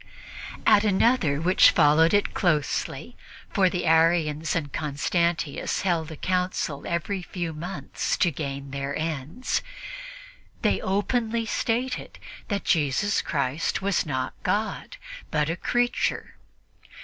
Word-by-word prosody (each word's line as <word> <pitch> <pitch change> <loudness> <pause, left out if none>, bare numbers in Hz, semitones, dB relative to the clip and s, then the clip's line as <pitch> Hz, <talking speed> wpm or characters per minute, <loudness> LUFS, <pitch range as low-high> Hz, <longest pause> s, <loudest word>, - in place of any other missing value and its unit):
At 205 - +6
another 200 - +2
which 180 +4 +6
followed 160 +1 +5
it 205 0 +2
closely 155 -6 -1 0.4
for 190 -2 +3
the 180 -1 -2
Arians 160 -1 +2
and 145 -5 -3
Constantius 155 +1 -1
held 170 -4 0
a - - -6
council 180 -4 -2
every 180 +3 -2
few 175 -2 -4
months 175 +5 -3
to 175 - +3
gain 140 -2 -5
their 140 +1 -3
ends 160 - -2 1.0
they - - +2
openly 225 +3 0
stated 245 +3 -2 0.3
that 200 -2 -2
Jesus 160 +5 +2
Christ 140 +4 -1
was 200 -2 +1
not 130 -5 -3
God, 220 - -2 0.3
but 150 0 0
a - - -2
creature. 245 +7 -1
170 Hz, 115 wpm, -25 LUFS, 150-200 Hz, 1.0 s, At